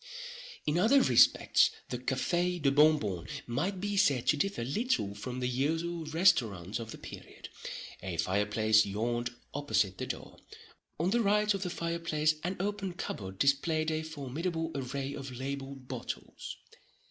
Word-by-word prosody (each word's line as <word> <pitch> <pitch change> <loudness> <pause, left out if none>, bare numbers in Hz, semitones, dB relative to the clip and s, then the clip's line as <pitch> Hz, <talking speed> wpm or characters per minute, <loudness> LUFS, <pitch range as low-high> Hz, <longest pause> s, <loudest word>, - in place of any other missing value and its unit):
In 150 +3 +1
other 230 +9 +6
respects 125 - +5 0.2
the 125 - -3
Café 175 +8 0
de 140 -3 +3
Bon 150 +2 +6
Bon 95 - -4 0.2
might 165 +11 -1
be 205 +1 -2
said 140 -11 +3
to - - +5
differ 195 -3 -1
little 130 - 0
from 125 +5 -5
the 125 - +1
usual 160 +6 -1
restaurants 125 - +2
of 115 -1 -6
the - - -7
period. - - -10 0.5
A 90 -3 -4
fireplace 105 +5 +3
yawned 120 +4 -2 0.2
opposite 105 -10 0
the - - -3
door. - - -6 0.6
On 175 +4 +1
the 235 +2 +3
right 210 0 +3
of 195 - -3
the 185 - -2
fireplace 165 -3 0
an 185 +2 -2
open 200 -1 -2
cupboard 95 - -5
displayed 155 - +2
a 155 0 -1
formidable 160 +2 -3
array 135 +1 -3
of 135 -2 -6
labelled 135 0 -5
bottles. - - -6
145 Hz, 150 wpm, -31 LUFS, 120-175 Hz, 0.6 s, other